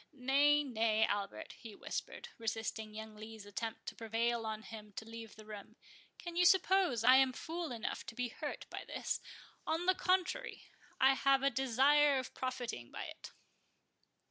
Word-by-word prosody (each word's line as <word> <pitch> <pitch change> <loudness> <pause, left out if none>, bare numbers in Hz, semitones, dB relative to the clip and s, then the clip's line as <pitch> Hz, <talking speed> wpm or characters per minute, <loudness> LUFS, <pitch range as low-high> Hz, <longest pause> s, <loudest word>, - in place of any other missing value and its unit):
—Nay, 285 +2 +4
nay, 220 -4 +2
Albert," 200 -2 -3
he 220 -3 -10
whispered, - - -5
resisting 220 -1 -3
young 220 0 -7
Lee's 215 0 -9
attempt 220 +2 -5
to - - -6
prevail 230 +1 -1
on 220 0 -4
him 215 -2 -9
to 220 - -6
leave 225 -1 -9
the 215 - -13
room, 215 +1 -9 0.4
"can 345 -1 -7
you 355 - +4
suppose 365 - +4
I 255 +2 +8
am 265 -1 +4
fool 330 +1 -4
enough 230 -2 -3
to 225 - -7
be 245 0 -1
hurt - - -5
by - - -5
this?—on 325 +2 -4
the 370 - +5
contrary, 370 +7 -1 0.3
I 265 +1 +6
have 270 0 +3
a 275 - +4
desire 270 +3 +4
of 260 - -4
profiting 250 - -4
by - - -6
it." - - -9
240 Hz, 165 wpm, -35 LUFS, 220-285 Hz, 0.4 s, I